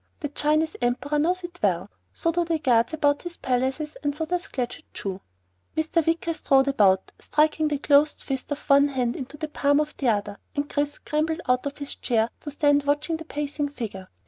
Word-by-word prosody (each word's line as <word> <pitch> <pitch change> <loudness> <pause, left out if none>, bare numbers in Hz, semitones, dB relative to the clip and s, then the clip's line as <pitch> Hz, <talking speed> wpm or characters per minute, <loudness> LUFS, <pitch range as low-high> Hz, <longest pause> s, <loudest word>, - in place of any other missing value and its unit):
The 295 - -2
Chinese 305 +2 +1
Emperor 255 +5 0
knows 360 +4 +1
it 350 0 -8
well. - - +1 0.2
So 330 - 0
do 345 +1 +1
the 335 -1 0
guards 240 -5 +3
about 290 -2 +2
his 350 -1 -7
palaces, 265 +4 -1
and 290 -1 0
so 320 +1 -2
does 355 +2 -2
Claggett 255 +5 -4
Chew." 195 -1 -4 0.6
Mr. 315 +1 +2
Wicker 330 +1 0
strode 270 -3 +3
about, 195 -8 +3
striking 310 +1 +2
the 295 -1 0
closed 290 +1 +3
fist 270 +1 -4
of 290 - -4
one 280 0 +6
hand 250 -4 -1
into 270 +3 -7
the 310 - -3
palm 285 -1 +2
of 300 0 -2
the 270 - -1
other, 205 -2 0 0.2
and 290 0 -1
Chris 290 -1 -1
scrambled 315 +3 -1
out 250 +2 +2
of 280 - -6
his 285 -1 -3
chair 230 -2 0
to 295 - -7
stand 290 0 +3
watching 300 +3 +1
the 320 - -9
pacing 290 -1 -3
figure. 210 -9 -6
290 Hz, 200 wpm, -25 LUFS, 265-310 Hz, 0.6 s, one